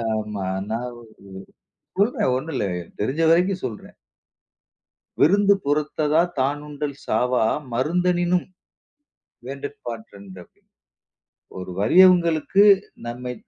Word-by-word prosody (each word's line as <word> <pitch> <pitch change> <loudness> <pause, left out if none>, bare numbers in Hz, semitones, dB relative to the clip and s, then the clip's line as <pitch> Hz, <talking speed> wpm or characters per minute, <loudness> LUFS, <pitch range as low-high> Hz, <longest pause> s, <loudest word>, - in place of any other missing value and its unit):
ஆமா. 105 -3 -4 0.2
நான் 115 +3 -3 1.1
ஓரு 205 - +5
சொல்றேன் 210 - 0
ஒண்ணுல்ல. 130 -6 -3
எனக்கு 85 - -17
தெரிஞ்ச 135 +10 -1
வரைக்கும் 180 +2 +2
சொல்றேன். 110 -5 -8 1.3
"விருந்து 200 +6 +5
புறத்ததா 150 +2 +1 0.2
தானுண்டல் 145 +1 -3
சாவா 125 +2 +1 0.3
மருந்தெனினும் 175 +6 0 1.0
வேண்டற்பாற் 135 -4 -7
றன்று" 100 -2 -13
அப்பிடீன்னு. - - -22 0.9
ஒரு 90 0 -7
வறியவங்களுக்கு, 175 - +4 0.4
நம்மை 125 +1 -5
145 Hz, 90 wpm, -22 LUFS, 120-175 Hz, 1.3 s, ஓரு